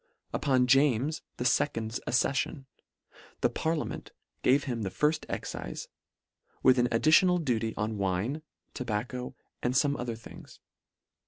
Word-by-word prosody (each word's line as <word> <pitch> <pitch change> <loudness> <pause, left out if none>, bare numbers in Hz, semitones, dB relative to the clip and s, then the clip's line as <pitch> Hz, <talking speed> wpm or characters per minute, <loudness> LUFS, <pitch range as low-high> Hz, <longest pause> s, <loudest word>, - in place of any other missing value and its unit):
Upon 130 -3 +2
James 135 +3 +3 0.2
the - - -2
fecond's 115 -3 +1
accemon, 135 +3 0 0.8
the - - +3
parlia 160 -1 -1
ment - - -7
h - - -32 0.3
gave 135 +2 +4
him 120 -4 -3
the 100 - -2
firfl 150 +11 +1
excife, - - -5 0.7
with 130 -1 +6
an 120 - +4
ad 115 - +1
ditional 175 +2 +5
duty 115 -3 0
on 105 0 -2
wine, 100 +10 -1 0.3
tobacco, 125 +2 -3 0.3
and 125 +1 0
fome 140 +1 +2
other 120 -1 -3
things. 115 - -13
125 Hz, 140 wpm, -29 LUFS, 115-145 Hz, 0.8 s, with